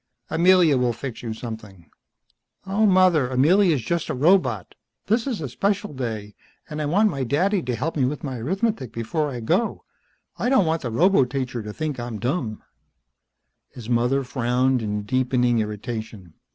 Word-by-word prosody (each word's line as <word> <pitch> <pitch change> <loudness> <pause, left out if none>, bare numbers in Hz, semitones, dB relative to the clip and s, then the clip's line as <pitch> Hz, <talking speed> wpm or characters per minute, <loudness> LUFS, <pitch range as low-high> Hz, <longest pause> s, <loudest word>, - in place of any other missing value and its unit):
"Amelia 170 -4 +5
will 125 -1 +1
fix 130 -1 -7
you 115 - -5
something." 110 -6 -8 0.8
"Aw, 200 +3 +1
mother. 185 -8 +4
Amelia's 155 - +3
just 170 +6 -2
a 155 - -1
robot. 130 - +2 0.3
This 225 +5 +1
is 235 -10 -2
a 145 - -3
special 200 - -1
day. 110 -6 -5 0.3
And 155 0 -5
I 150 - -1
want 205 +7 +3
my 135 -1 -3
daddy 180 - +1
to 125 -1 -2
help 150 +9 -3
me 135 -4 +2
with 145 +3 -3
my 130 -4 -4
arithmetic 190 - -1
before 145 +7 -2
I 125 -3 -5
go. 180 - 0 0.6
I 245 - +1
don't 260 -8 +4
want 160 0 0
the 125 - -3
roboteacher 130 - +1
to 105 - -6
think 150 +1 -4
I'm 120 -2 -5
dumb." 120 - -3 1.1
His 120 -1 -8
mother 125 +3 +2
frowned 125 0 +1
in 105 -1 -3
deepening 125 0 +1
irritation. 105 -4 -5
130 Hz, 165 wpm, -23 LUFS, 120-170 Hz, 1.1 s, Amelia